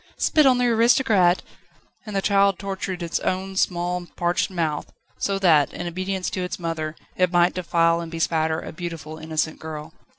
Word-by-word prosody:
"Spit 305 -3 +4
on 255 -1 +5
the 250 - +2
aristocrat!" 225 -6 +4 0.6
And 210 - -5
the 195 - 0
child 200 -2 +3
tortured 190 -2 -4
its 170 - -1
own 190 +1 -2
small, 175 -1 0
parched 175 0 0
mouth 165 -5 -2 0.3
so 200 -1 0
that, 160 -7 +4
in 175 - -5
obedience 185 +2 -3
to 185 - -3
its 180 - -4
mother, 165 -2 -3 0.2
it 180 -1 +2
might 175 0 +4
defile 170 -2 +2
and 165 -1 -7
bespatter 160 -1 0
a - - -7
beautiful, 160 -2 -6
innocent 155 0 -2
girl. 155 0 -7
175 Hz, 170 wpm, -23 LUFS, 165-195 Hz, 0.6 s, on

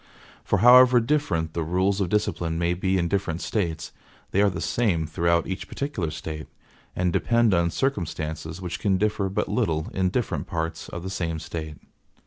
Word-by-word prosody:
For - - +1
however 125 0 +8
different 115 - 0
the 85 - -2
rules 95 +5 +1
of 90 - 0
discipline 85 -5 0
may 85 +1 +1
be 95 +2 0
in 85 -2 +1
different 90 -3 -1
States, 85 -8 -2 0.4
they 100 - +3
are 105 - +5
the 95 - -5
same 95 -10 0
throughout 85 +2 +1
each 95 0 -5
particular 125 - -3
State; 75 0 -6 0.5
and 90 -1 0
depend 115 -3 +3
on 85 -1 +2
circumstances 80 - -3
which 90 -2 -5
can 100 -3 +2
differ 105 -1 0
but 95 - -1
little 80 -1 -1
in 95 -1 +1
different 120 +4 -2
parts 80 -2 -4
of 85 - -6
the 95 - -5
same 85 -4 -2
State.) 80 -1 -6
90 Hz, 175 wpm, -25 LUFS, 80-100 Hz, 0.5 s, however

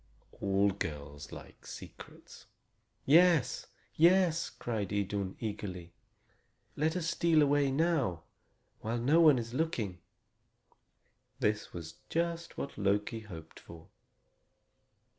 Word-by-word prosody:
All 100 0 +2
girls 75 -6 -6
like - - -12
secrets. - - -11 0.6
"Yes 165 -3 +4 0.3
yes!" 170 0 +4
cried 110 -5 -4
Idun 100 -1 -2
eagerly. 95 -6 -5 0.8
"Let 160 +3 0
us 170 -2 -2
steal 165 -2 +3
away 145 -1 +3
now, 135 - +1 0.6
while 115 +2 -2
no 140 +8 +4
one 155 -5 +7
is 115 0 -4
looking." 125 - -2 1.4
This 105 0 0
was 80 -2 -8
just 170 0 -2
what 140 - -5
Loki 105 +3 0
hoped 85 -7 -11
for. 80 -1 -13
115 Hz, 105 wpm, -32 LUFS, 95-160 Hz, 1.4 s, one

